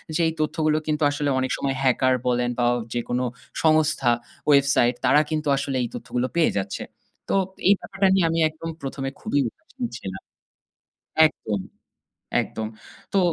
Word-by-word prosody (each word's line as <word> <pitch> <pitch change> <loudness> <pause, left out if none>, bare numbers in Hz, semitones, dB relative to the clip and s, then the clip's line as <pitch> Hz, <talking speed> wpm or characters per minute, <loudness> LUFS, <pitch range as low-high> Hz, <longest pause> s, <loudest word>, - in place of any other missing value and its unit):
যে 170 - +2
এই 160 - -1
তথ্যগুলো 155 0 +1
কিন্তু 155 0 0
আসলে 145 0 -1
অনেক 130 0 -1
সময় 135 -1 -1
hacker 130 0 +3
বলেন 125 0 +1
বা 120 - +2
অ - - +1 0.2
যেকোনো 120 +1 -1 0.4
সংস্থা, 155 -5 +3 0.4
website 140 -3 +4
তারা 150 - +6
কিন্তু 155 -1 -2
আসলে 135 -1 -2
এই - - -1
তথ্যগুলো 125 +1 -2
পেয়ে 170 -2 +4
যাচ্ছে। 100 0 -3 0.5
তো - - +2 0.3
এই 200 - +8
ব্যাপারটা 195 0 0
নিয়ে 190 -3 +3
আমি 165 0 0
একদম 160 +1 -7
১ম 135 0 -5
এ - - -11
খুবই 215 -10 0
উদাসীন 265 - -8
ছিলাম 95 0 -7 1.1
একদম, 105 -9 -4 0.8
একদম। 110 -1 -5 0.5
তো 195 - +4
145 Hz, 160 wpm, -24 LUFS, 125-155 Hz, 1.1 s, এই